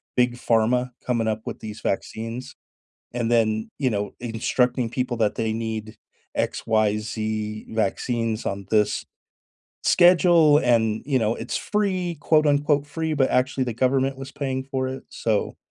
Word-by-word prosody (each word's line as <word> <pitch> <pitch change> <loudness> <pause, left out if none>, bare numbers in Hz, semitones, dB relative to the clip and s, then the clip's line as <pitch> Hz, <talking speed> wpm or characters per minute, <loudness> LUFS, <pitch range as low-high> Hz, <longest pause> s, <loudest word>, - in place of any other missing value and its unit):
Big 125 -1 +2
Pharma 120 +2 +1
coming 115 -3 0
up 110 0 -1
with - - -5
these 110 0 -7
vaccines, 115 +5 -4 0.6
and 120 -1 -1
then, 110 -2 +1
you 130 -3 +1
know, 100 -1 -2
instructing 120 +1 0
people 125 -1 -2
that 105 -2 +2
they 110 -1 0
need 110 -1 -4 0.4
X, - - -2
Y, 110 -2 +2
Z 110 0 -4
vaccines 115 +1 -1
on 100 -1 -3
this 105 -1 +2 0.8
schedule, 175 -4 +6
and, 115 -4 +2
you 135 -3 +2
know, 110 0 +1
it's - - -4
free, 185 -5 -1
quote 155 -1 +3
unquote 145 0 +2
"Free," 160 0 -2
but 135 -2 +2
actually 130 +1 +1
the 120 - -3
government 135 +2 +1
was 135 0 -7
paying 135 -2 -2
for 130 -1 -2
it, 130 +1 -6
so, 110 -3 -1
120 Hz, 155 wpm, -24 LUFS, 110-135 Hz, 0.8 s, schedule